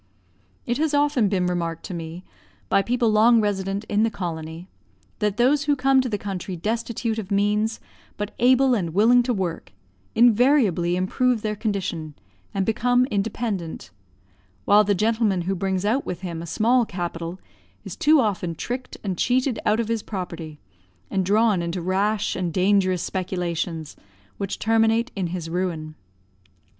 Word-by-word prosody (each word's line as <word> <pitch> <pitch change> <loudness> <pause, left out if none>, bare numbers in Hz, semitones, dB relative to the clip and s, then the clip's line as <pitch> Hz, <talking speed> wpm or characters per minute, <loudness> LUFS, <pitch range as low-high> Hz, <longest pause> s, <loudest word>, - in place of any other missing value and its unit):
It 240 +3 -1
has 310 -1 +1
often 285 -7 +2
been 185 -2 0
remarked 170 -2 -2
to - - -6
me 165 +1 -6 0.5
by 195 - +4
people 240 +1 +1
long 225 +2 +5
resident 200 -1 -1
in 210 -1 0
the 225 - +3
colony, 165 -3 -6 0.5
that 210 -1 0
those 275 +4 +3
who 290 0 +3
come 270 0 +3
to 255 - -3
the 210 - -1
country 195 -2 -5
destitute 225 +4 -2
of 205 -3 -6
means, 210 +2 +1 0.4
but 210 0 -4
able 255 +2 +4
and 175 -7 -1
willing 235 +5 +5
to 245 +1 -1
work, 185 - -3 0.4
invariably 230 - +4
improve 220 +6 +1
their 215 -1 -1
condition 190 -8 -3 0.4
and 195 -1 -1
become 245 +3 +2
independent; 200 - -3 0.7
while 210 +1 +6
the 205 0 +1
gentleman 215 -2 +1
who 190 +3 -1
brings 190 0 -1
out 245 +7 +1
with 175 - -5
him 170 -3 -5
a 170 - -7
small 235 +8 +3
capital 175 -3 -5 0.5
is - - -6
too 305 0 +4
often 185 -7 -1
tricked 250 +9 -5
and 190 -4 -3
cheated 255 0 +1
out 215 +2 +3
of 230 - -1
his 230 -1 -1
property, 170 -7 -6 0.5
and 195 -1 +1
drawn 210 -2 +3
into 170 +2 -3
rash 195 +4 0
and 180 -2 -2
dangerous 185 -2 +2
speculations 175 -4 -3 0.4
which 195 -1 -3
terminate 225 +2 +2
in 190 -3 -1
his 170 -1 -5
ruin. 165 -3 -3
205 Hz, 155 wpm, -23 LUFS, 180-230 Hz, 0.7 s, while